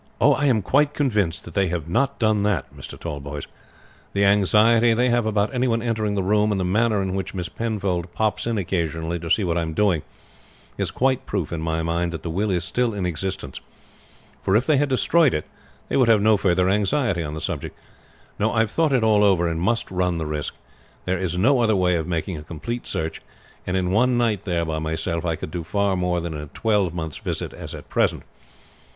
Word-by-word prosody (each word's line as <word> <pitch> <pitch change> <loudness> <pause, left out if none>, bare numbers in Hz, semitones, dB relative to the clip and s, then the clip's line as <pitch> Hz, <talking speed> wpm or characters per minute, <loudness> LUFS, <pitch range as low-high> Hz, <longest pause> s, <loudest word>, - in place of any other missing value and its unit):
"I 145 - +4
am 115 -6 +2
quite 145 +7 +2
convinced 105 - -1
they 100 -1 +2
have 85 -3 -3
not 125 +10 0
done 110 -2 +2
that, 100 -9 -1
Mr. - - -9
Tallboys. 70 0 -6 0.7
The 100 0 +2
anxiety 110 +4 +4
they 125 +2 +2
have 120 -2 +2
about 105 +2 0
any 130 0 +1
one 115 -1 0
entering 110 -3 -1
the 100 - 0
room, 105 +2 +2
and 100 - 0
the 90 - 0
manner 105 +2 +2
in 95 -1 -2
which 95 0 -4
Miss 90 -1 -3
Penfold 95 -6 -2
pops 110 +1 0
in 115 -1 0
occasionally 85 -3 -2
to 85 0 -6
see 105 - +3
what 85 -1 0
I - - 0
am 80 -1 -4
doing, 95 -6 +2 0.7
is - - -1
quite 130 0 0
proof 95 -6 -2
in 80 - -3
my 80 0 -1
mind 85 +1 -1
that 80 - -6
the 85 - -3
will 100 +5 0
is 90 -3 0
still 115 +4 0
in 95 -3 -2
existence; 90 +2 -4 0.8
for 95 - +1
if 120 +4 +3
they 150 0 +3
had 145 +1 +1
destroyed 145 +3 +3
it, 75 - -2 0.4
they - - 0
would 130 -3 +4
have 115 -2 +5
no 110 0 +5
further 90 -2 +2
anxiety 100 0 +1
on 75 -1 -4
the - - -4
subject. - - -4 0.6
No, 110 +2 +2
I 115 - +2
have 110 -1 0
thought 160 -3 +2
it 125 -4 +3
all 105 -2 +4
over, 95 -4 +3
and 80 0 -2
must 115 +3 0
run 90 -2 0
the 80 - -3
risk. 75 -1 -3 0.5
There 90 0 0
is 90 -2 -2
no 125 +8 +4
other 110 -3 +3
way 90 -1 +2
of 80 -1 -1
making 85 -1 -2
a - - -8
complete 85 +10 -6
search; 80 0 -3 0.5
and 90 +1 0
in 90 -1 0
one 125 +4 +3
night 110 -5 0
there 85 -3 0
by 80 -1 -2
myself 80 +1 -2
I 85 -1 0
could 80 - -7
do 85 0 -4
far 100 +3 0
more 90 -1 0
than 85 -1 -4
in 75 - -5
a 75 - -8
twelvemonths' 90 -5 -1
visits - - -3
as - - -8
at - - -11
present. - - 0
95 Hz, 220 wpm, -23 LUFS, 85-110 Hz, 0.8 s, have